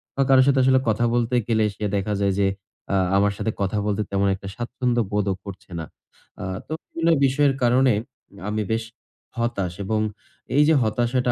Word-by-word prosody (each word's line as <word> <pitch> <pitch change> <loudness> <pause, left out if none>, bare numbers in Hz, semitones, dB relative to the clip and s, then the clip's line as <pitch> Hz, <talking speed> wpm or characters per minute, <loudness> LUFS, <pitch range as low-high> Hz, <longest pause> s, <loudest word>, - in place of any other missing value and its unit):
বা 135 - +1
কারো 130 -1 +7
সাথে 135 -1 +4
আসলে 130 0 +5
কথা 110 +2 +2
বলতে 120 +1 +1
গেলে 110 -2 +2
সে 105 - -4
দেখা 100 +1 -1
যায় 100 -1 +2
যে 100 - +3 0.5
আ - - +3 0.2
আমার 100 0 +3
সাথে 110 - -1
কথা 100 +2 0
বলতে 105 0 0
তেমন 100 0 +2
একটা 95 0 -10
স্বাচ্ছন্দ্য 120 0 -1
বোধও 100 -2 0
করছে 100 -2 -10
না। 80 - -4 0.6
আ - - -3 0.2
তো - - -12
বিভিন্ন 165 0 -1 0.2
বিষয়ের 135 +1 +3
কারণে 125 0 +4 0.6
আমি 105 0 -1
বেশ 115 0 0 0.5
হতাশ 100 -7 -1
এবং 110 +1 0 0.6
এইযে 150 +2 +5
হতাশাটা 120 +3 +1
115 Hz, 175 wpm, -23 LUFS, 100-130 Hz, 0.6 s, কারো